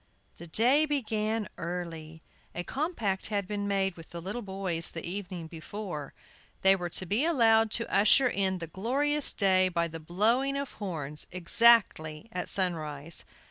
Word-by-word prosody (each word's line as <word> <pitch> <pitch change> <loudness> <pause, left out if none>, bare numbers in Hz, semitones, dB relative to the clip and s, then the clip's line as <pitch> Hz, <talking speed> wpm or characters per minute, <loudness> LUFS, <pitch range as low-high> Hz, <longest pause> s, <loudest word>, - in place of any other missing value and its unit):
THE 170 - -9
day 250 - +4
began 220 -6 -1
early. 165 -2 -6 0.3
A 175 - -3
compact 235 - -2
had 200 -3 -2
been 205 0 -3
made 195 -2 0
with 165 -1 -13
the 170 - -7
little 195 +8 -5
boys 190 -5 -3
the 165 - -7
evening 180 -2 -5
before. 160 -1 -7 0.5
They 190 0 +6
were 175 -2 -4
to 185 - -2
be 205 - +1
allowed 225 -9 +4
to 230 - 0
usher 220 +6 +5
in 195 -5 0
the 170 - -5
glorious 270 - +1
day 185 -2 +3
by 170 -1 0
the 165 0 -8
blowing 230 - +1
of 280 -1 -4
horns 150 -6 -4
exactly 180 -2 +3
at 180 - -4
sunrise. 165 -4 -1
190 Hz, 155 wpm, -29 LUFS, 170-225 Hz, 0.5 s, They